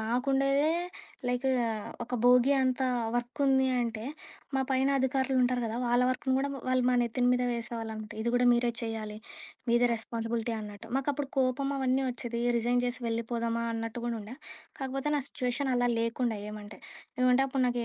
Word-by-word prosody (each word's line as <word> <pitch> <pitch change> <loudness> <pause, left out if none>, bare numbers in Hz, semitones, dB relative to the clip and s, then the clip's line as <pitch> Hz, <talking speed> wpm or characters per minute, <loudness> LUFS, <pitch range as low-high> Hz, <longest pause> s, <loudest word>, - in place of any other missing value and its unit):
మాకుండేదే, 275 +5 +2 0.6
like 250 +2 0 0.6
ఒక 250 - -4
భోగీ 250 +2 +6
అంత 260 0 +1 0.3
వర్కుంది 265 +2 +2
అంటే 230 -2 -3 0.5
మా 265 - +2
పైన 265 +1 +3
అధికారులు 265 0 +1
ఉంటారు 250 0 +2
గదా! 225 +1 -3
వాళ్ళ 240 +1 +3
వర్క్‌ని 260 0 0
కూడా 280 +1 0 0.2
వాళ్ళు 255 -1 +2
మా - - +3
నెత్తిని 245 +1 +1
మీద 250 0 +2
వేసేవాళ్ళు 230 -1 -4 0.3
ఇది 235 - -1
కూడా 245 - +3
మీరే 240 0 +2
చేయాలి, 220 -2 -4 0.5
మీదే 240 +1 +5
రెస్పాన్సిబిలిటీ 230 0 -3
అన్నట్టు, 210 +1 -9
మాకప్పుడు 280 0 -1
కోపం 265 +1 +1
అవన్నీ 265 0 +1
వచ్చేది. 235 -1 -4 0.2
రిజైన్ 240 +1 +2
చేసి 245 +1 -2
వెళ్ళిపోదామా 230 0 -1
అన్నట్టు 225 +1 -4
కూడా 235 -1 -1
ఉండే. 220 +6 -9 0.4
కాకపోతే 270 +2 -2
నా - - +1
సిట్యుయేషన్ 260 0 -1
అలా 245 0 +2
లేకుండే 230 -1 0
ఏమంటే. 210 0 -9 0.4
ఏమంటే 255 +1 +5
అప్పుడు 265 -1 0
నాకి 240 -1 0
245 Hz, 155 wpm, -30 LUFS, 230-265 Hz, 0.6 s, భోగీ